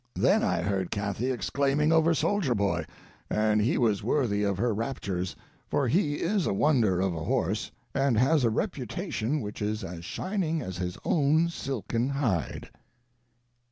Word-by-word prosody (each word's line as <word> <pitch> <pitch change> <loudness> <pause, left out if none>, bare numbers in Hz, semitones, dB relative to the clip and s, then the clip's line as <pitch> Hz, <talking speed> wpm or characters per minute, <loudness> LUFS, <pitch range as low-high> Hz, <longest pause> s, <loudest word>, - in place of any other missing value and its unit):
Then - - +3
I - - +1
heard 95 -2 -1
Cathy 100 +4 -2
exclaiming 140 +4 +1
over 165 0 +4
Soldier 165 -5 +1
Boy; 90 -6 0 0.4
and 105 0 +2
he 110 - +2
was 110 -5 +2
worthy 110 -3 +1
of 100 -2 0
her 115 +2 +1
raptures, 100 -5 -3 0.3
for 135 +2 +1
he 145 - +2
is 190 +3 0
a - - +1
wonder 115 -8 +3
of 95 -1 +1
a 80 -1 -4
horse, - - 0 0.2
and 135 -4 +2
has 135 +4 +3
a 115 - +4
reputation 115 +4 -2
which 105 -1 -6
is 105 +1 -2
as 85 -2 -7
shining 175 - -2
as 95 - -5
his 90 -1 -3
own 155 +2 +3
silken 125 - -2
hide. 125 - -2
120 Hz, 160 wpm, -28 LUFS, 100-145 Hz, 0.4 s, over